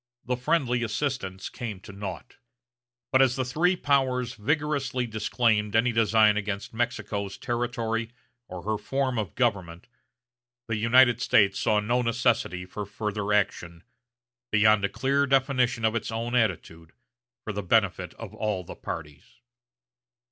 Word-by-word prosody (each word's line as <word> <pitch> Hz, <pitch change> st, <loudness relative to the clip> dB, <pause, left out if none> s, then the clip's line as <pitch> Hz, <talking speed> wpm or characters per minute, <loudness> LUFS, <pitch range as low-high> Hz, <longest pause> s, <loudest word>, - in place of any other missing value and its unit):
The 125 Hz, -, 0 dB
friendly 125 Hz, -2 st, 0 dB
assistance 115 Hz, -5 st, -3 dB
came 110 Hz, -7 st, -6 dB
to 100 Hz, -, -11 dB
naught; 100 Hz, +4 st, -7 dB, 0.7 s
but 130 Hz, -, +5 dB
as 130 Hz, -2 st, +4 dB
the 130 Hz, -1 st, -1 dB
three 165 Hz, +9 st, +2 dB
powers 130 Hz, -5 st, +1 dB
vigorously 140 Hz, +1 st, -1 dB
disclaimed 110 Hz, -1 st, 0 dB
any 115 Hz, +2 st, +3 dB
designs 110 Hz, -2 st, +4 dB
against 100 Hz, 0 st, -5 dB
Mexico's 105 Hz, -4 st, -3 dB
territory 115 Hz, -2 st, -2 dB, 0.4 s
or 90 Hz, -1 st, -8 dB
her 105 Hz, +1 st, -1 dB
form 135 Hz, -3 st, -1 dB
of 100 Hz, -6 st, -4 dB
government, 95 Hz, -8 st, -1 dB, 0.8 s
the 115 Hz, -, -1 dB
United 120 Hz, +2 st, +4 dB
States 100 Hz, -5 st, +3 dB
saw 105 Hz, -1 st, +2 dB
no 120 Hz, +4 st, +1 dB
necessity 115 Hz, -6 st, 0 dB
for 105 Hz, +3 st, -6 dB
further 105 Hz, 0 st, -3 dB
action, 85 Hz, -4 st, -1 dB, 0.7 s
beyond 110 Hz, -1 st, +4 dB
a 100 Hz, -, +1 dB
clear 140 Hz, +6 st, +1 dB
definition 130 Hz, -3 st, +2 dB
of 110 Hz, -, +2 dB
its 115 Hz, -, -2 dB
own 115 Hz, +2 st, -3 dB
attitude 85 Hz, -9 st, -1 dB, 0.5 s
for 110 Hz, -, -4 dB
the 105 Hz, -, -3 dB
benefit 95 Hz, -3 st, +1 dB
of 110 Hz, -3 st, -9 dB
all 105 Hz, -4 st, -2 dB
the -, -, -9 dB
parties. 75 Hz, -3 st, -8 dB
115 Hz, 140 wpm, -26 LUFS, 105-125 Hz, 0.8 s, but